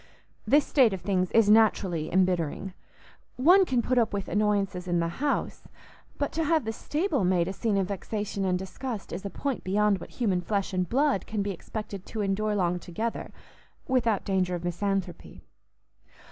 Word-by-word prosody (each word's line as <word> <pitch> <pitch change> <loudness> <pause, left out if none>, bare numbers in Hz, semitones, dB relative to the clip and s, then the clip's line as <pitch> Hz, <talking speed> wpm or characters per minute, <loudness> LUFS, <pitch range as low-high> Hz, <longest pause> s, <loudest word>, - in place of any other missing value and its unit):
This 290 +1 +5
state 250 -8 +4
of 190 - -5
things 185 -2 0
is 225 -2 +4
naturally 200 -7 +3
embittering; 185 0 0 0.6
one 360 +9 +6
can 250 -6 0
put 255 +1 +2
up 230 - +1
with 200 -1 -3
annoyances 200 -3 0
in 175 -1 +1
the 170 - 0
house, 290 -1 -1 0.5
but 285 - -1
to 325 - -1
have 315 -3 +2
the 220 - -2
stable 300 - -1
made 180 -2 +2
a 190 - -3
scene 210 0 0
of 190 -1 0
vexation 205 0 -3
and 185 -1 +1
disgust 205 +4 -6
is 180 - -5
a 200 - -4
point 275 +4 -3
beyond 205 +1 +2
what - - -9
human 195 -7 0
flesh 200 +2 -2
and 185 -1 -1
blood 275 -4 +1
can 215 -2 -2
be 200 - -2
expected 200 +1 -7
to 220 - -4
endure 210 +2 0
long 180 -2 0
together 220 +7 -4 0.6
without 235 -5 +1
danger 185 -2 0
of 175 - -6
misanthropy. 185 0 -3
200 Hz, 175 wpm, -27 LUFS, 185-230 Hz, 0.6 s, one